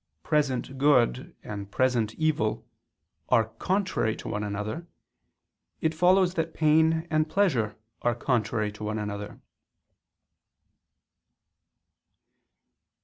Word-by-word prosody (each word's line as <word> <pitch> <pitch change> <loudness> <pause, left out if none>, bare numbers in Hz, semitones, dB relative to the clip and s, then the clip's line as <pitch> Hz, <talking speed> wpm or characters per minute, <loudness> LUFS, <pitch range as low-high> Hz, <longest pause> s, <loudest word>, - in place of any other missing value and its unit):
present 135 -3 0
good 130 -3 +2
and 100 -2 -6
present 120 -2 +1
evil, 150 -9 0 0.6
are 115 -3 +3
contrary 185 - 0
to - - -9
one 105 +1 -2
another, 105 +11 -4 0.9
it 160 0 0
follows 180 +2 +4
that 165 -2 -2
pain 160 +1 +3
and 155 0 +2
pleasure 155 - +1 0.3
are 120 -1 +1
contrary 110 -4 0
to 105 +1 -10
one 110 +1 -2
another. 105 -1 -5
130 Hz, 95 wpm, -27 LUFS, 110-160 Hz, 0.9 s, follows